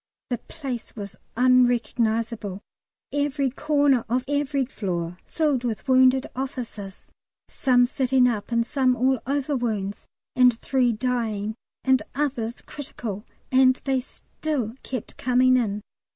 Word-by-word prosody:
The 245 - 0
place 265 -8 -7
was 200 -3 -7 0.2
unrecognisable: 230 -4 +2 0.5
every 285 -2 0
corner 285 -3 +2
of 250 +2 0
every 285 -1 0
floor 180 -7 -4
filled 295 -6 +1
with 225 -2 -3
wounded 260 0 +5
officers 240 -7 -6 0.4
some 250 -2 +3
sitting 255 0 +2
up 225 -2 -2
and 235 0 +2
some 260 -1 +2
all 260 +1 +2
over 285 +1 0
wounds, 210 -5 -2 0.3
and 250 -2 +5
three 255 -3 +2
dying 220 -3 -1 0.3
and 260 -3 +4
others 250 -5 -2
critical; 225 -7 -6 0.3
and 260 0 +6
they 265 -2 +1
still 260 -3 -4
kept 255 -4 -6
coming 255 0 +4
in. 210 -4 0
250 Hz, 125 wpm, -25 LUFS, 225-265 Hz, 0.5 s, and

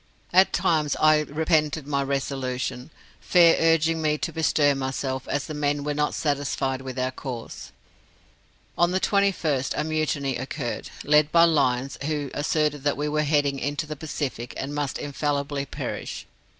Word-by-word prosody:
At 185 +2 +6
times 160 -5 +1
I 155 0 +5
repented 155 0 0
my 140 -1 0
resolution, 135 -1 -3 0.3
Fair 170 -2 +5
urging 165 0 +3
me 150 -1 +1
to - - -4
bestir 155 -3 +3
myself, 130 -1 -3
as 145 - -1
the 155 - -6
men 145 -1 -1
were 150 0 -1
not 150 0 0
satisfied 140 -2 -1
with 130 -1 -7
our 130 0 0
course. 125 -3 -7 1.1
On 175 0 +5
the 185 +1 +1
21st 180 -10 +1
a 150 - +1
mutiny 155 -4 -1
occurred, 130 0 -4
led 150 +1 +4
by 170 0 +6
Lyons, 135 -5 +2
who 150 -2 -2
asserted 150 -1 0
we 150 +1 -1
were 150 0 +1
heading 145 -2 +1
into 145 +4 -2
the 155 0 -6
Pacific, 140 -5 -5
and 140 +2 -4
must 145 -2 -2
infallibly 140 -1 -2
perish. - - -5
145 Hz, 150 wpm, -25 LUFS, 135-155 Hz, 1.1 s, At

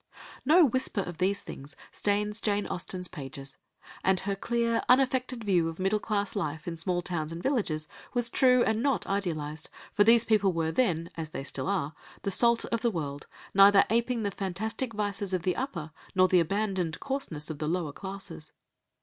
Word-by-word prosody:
_) - - -15 0.2
No 325 +5 +7
whisper 260 -5 0
of 175 -3 -7
these 195 +2 +1
things 140 +2 -9 0.2
stains 210 +1 -1
Jane 205 -1 0
Austen's 180 +1 -3
pages. 135 -3 -8 0.5
And 190 -1 +2
her 200 +1 -1
clear, 235 +2 0
unaffected 255 -2 +2
view 180 -5 +2
of 165 - -8
middle 195 +3 +1
class 205 -1 -1
life 155 -5 -3
in 170 - -3
small 175 +2 -1
towns 165 -4 -3
and 165 +1 -6
villages 185 - 0 0.3
was 240 -1 +2
true 250 +1 +4
and 220 0 +1
not 270 -7 +1
idealised, 160 -6 -3 0.2
for 205 - +5
these 230 +1 +6
people 205 -4 +3
were 165 -1 0
then, 170 -7 0
as 160 -2 -4
they 135 - -5
still 140 - -4
are, 165 -7 -1 0.3
the 200 - -1
salt 235 +4 +4
of 230 -1 -2
the 235 - +2
world, 145 -7 -4 0.3
neither 195 0 +7
apeing 235 0 +1
the 200 - -1
fantastic 215 +6 -3
vices 205 -2 -2
of 175 - -3
the 180 -1 +1
upper, 170 - -4 0.2
nor 185 0 +6
the 185 -1 +4
abandoned 185 -1 -1
coarseness 225 - -3
of 150 - -7
the 155 - -2
lower 165 -3 -1
classes. 190 -5 -8
195 Hz, 185 wpm, -29 LUFS, 165-225 Hz, 0.5 s, No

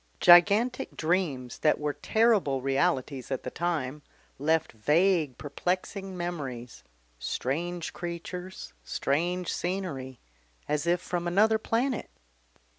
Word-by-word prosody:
Gigantic 205 +9 +5
dreams 155 -8 -1
that 155 - +3
were 150 -1 -1
terrible 215 - +2
realities 135 0 0
at 135 -2 -3
the - - -5
time, 150 -5 -2 0.4
left 160 +2 +1
vague 150 - +2
perplexing 185 +5 -3
memories, 135 -9 -5 0.4
strange 165 - -3
creatures, 175 - -6
strange 170 - -1
scenery, 160 -9 -4 0.5
as 150 +2 -1
if 175 +1 +2
from 175 -1 -3
another 215 +5 +4
planet. 240 +3 -1
170 Hz, 105 wpm, -28 LUFS, 140-185 Hz, 0.5 s, Gigantic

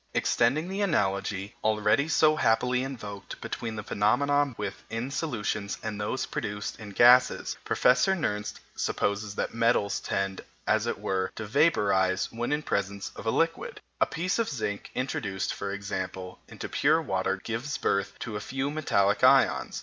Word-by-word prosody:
Extending 140 +8 +2
the 195 +2 -3
analogy, 100 - 0
already 110 +6 +2
so 155 -1 +4
happily 125 -1 +2
invoked, 105 -7 -7
between 115 -2 -5
the 105 - -5
phenomena 140 +9 +2
met 130 - -11
with 100 -2 -5
in 115 +4 -3
solutions 105 -9 -2
and 105 -2 -4
those 130 +5 -1
produced 105 +1 -4
in 110 -2 -8
gases, 120 +5 +5
Professor 190 +10 +3
Nernst 105 - -2 0.2
supposes 100 0 -1
that - - -2
metals 115 -3 +2
tend, 95 -1 -2 0.2
as - - +2
it - - -2
were, 95 -1 -1
to 110 - -5
vaporize 100 - +2
when 120 +3 -3
in 150 +1 0
presence 100 -3 -2
of - - -7
a - - +4
liquid. - - 0 0.2
A - - +4
piece 180 +7 -1
of 230 - +1
zinc 110 -7 -3
introduced, 100 -7 -2
for 100 0 -4
example, 95 -2 -5
into - - -7
pure 155 +3 +3
water 95 -9 -1
gives 115 +8 -4
birth 100 0 -1
to 115 -3 -4
a - - -2
few 135 +2 -2
metallic 105 -10 +1
ions. - - +4
110 Hz, 160 wpm, -28 LUFS, 100-135 Hz, 0.2 s, gases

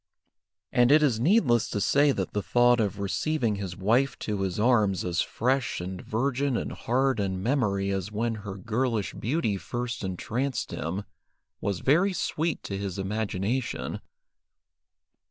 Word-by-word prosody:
And 120 +2 +4
it 155 +1 +6
is 125 -7 +2
needless 125 - +3
to 105 - -2
say 145 +7 +4
that 95 -8 -3
the 105 - 0
thought 120 +2 +4
of 105 -3 0
receiving 105 - 0
his 95 -3 -5
wife 120 +8 +2
to 105 -2 -2
his 95 0 -2
arms 105 -5 +3
as 85 -2 +1
fresh 130 +1 0
and 90 +1 -5
virgin 135 +3 0
in - - -3
heart 130 0 0
and 95 -2 -2
memory 100 -7 +1
as 95 +1 -2
when 115 +2 -1
her 100 -2 -6
girlish 115 +1 -1
beauty 115 -4 -1
first 120 +2 -4
entranced 115 +8 -2
him, 90 +6 -3 0.6
was 100 -3 -2
very 175 +8 +3
sweet 165 -2 -1
to 100 -1 -4
his 100 -2 -4
imagination. 105 +4 -2
110 Hz, 150 wpm, -27 LUFS, 100-130 Hz, 0.6 s, it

